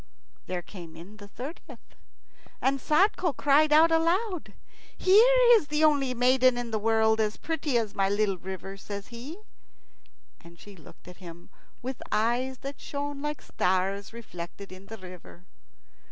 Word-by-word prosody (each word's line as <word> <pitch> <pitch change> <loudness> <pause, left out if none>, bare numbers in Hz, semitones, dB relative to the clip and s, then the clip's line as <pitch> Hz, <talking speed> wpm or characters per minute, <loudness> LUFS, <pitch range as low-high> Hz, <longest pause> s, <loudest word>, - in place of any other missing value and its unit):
There 180 -1 -4
came 170 -3 -11
in 180 +6 -12
the 205 -1 -12
thirtieth, 265 - -10 0.7
and 275 +1 +1
Sadko 350 - +2
cried 295 +2 +4
out 320 +2 +6
aloud. 345 +3 0 0.4
"Here 450 +7 +5
is 435 -10 +5
the 300 +1 0
only 280 -4 +3
maiden 255 0 +4
in 240 -1 -4
the 220 - -1
world 220 0 +2
as 215 -1 0
pretty 300 -5 -1
as 220 -3 -2
my 195 -1 +1
little 200 -2 0
river!" 190 +2 -7
says 200 0 -8
he. 250 +8 -8 1.1
And 170 +1 -15
she 205 -1 -13
looked 165 0 -17
at 180 - -12
him 175 -2 -12 0.3
with 260 0 -5
eyes 245 +4 0
that 275 +1 -7
shone 285 0 -5
like 295 0 -4
stars 190 +2 -1
reflected 200 -4 -9
in 185 +1 -12
the 225 - -8
river. 180 -2 -13
235 Hz, 155 wpm, -27 LUFS, 195-290 Hz, 1.1 s, out